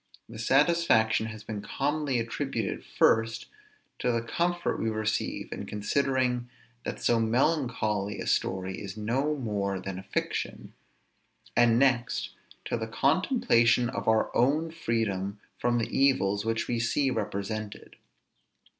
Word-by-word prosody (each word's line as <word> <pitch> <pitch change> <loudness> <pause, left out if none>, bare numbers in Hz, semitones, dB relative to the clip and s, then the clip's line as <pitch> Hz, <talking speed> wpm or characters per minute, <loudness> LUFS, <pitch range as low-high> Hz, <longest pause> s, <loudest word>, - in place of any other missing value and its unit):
The 115 -1 -10
satisfaction 130 -4 +3
has 110 -1 -8
been 105 -2 -5
commonly 145 +4 -1
attributed, 115 -2 -2
first, 115 0 +2 0.5
to 125 - +1
the 115 -1 0
comfort 175 +8 -1
we 115 - 0
receive 110 0 -2
in - - -6
considering 125 +2 0 0.3
that - - -4
so 120 - +2
melancholy 115 -5 0
a - - -4
story 95 0 -1
is 100 +1 -7
no 130 +8 0
more 100 -7 -2
than 95 0 -5
a - - -9
fiction; - - -3 0.8
and, 115 -1 +5
next, 120 - +1 0.3
to - - -1
the 110 -1 -4
contemplation 125 - +3
of - - -5
our 110 0 +2
own 150 +6 +2
freedom 105 - -2 0.2
from 120 0 +1
the 115 - -2
evils 105 -7 +2
which 115 0 -1
we 120 -1 -1
see 130 +4 +1
represented. 105 -1 -4
115 Hz, 130 wpm, -28 LUFS, 105-135 Hz, 0.8 s, and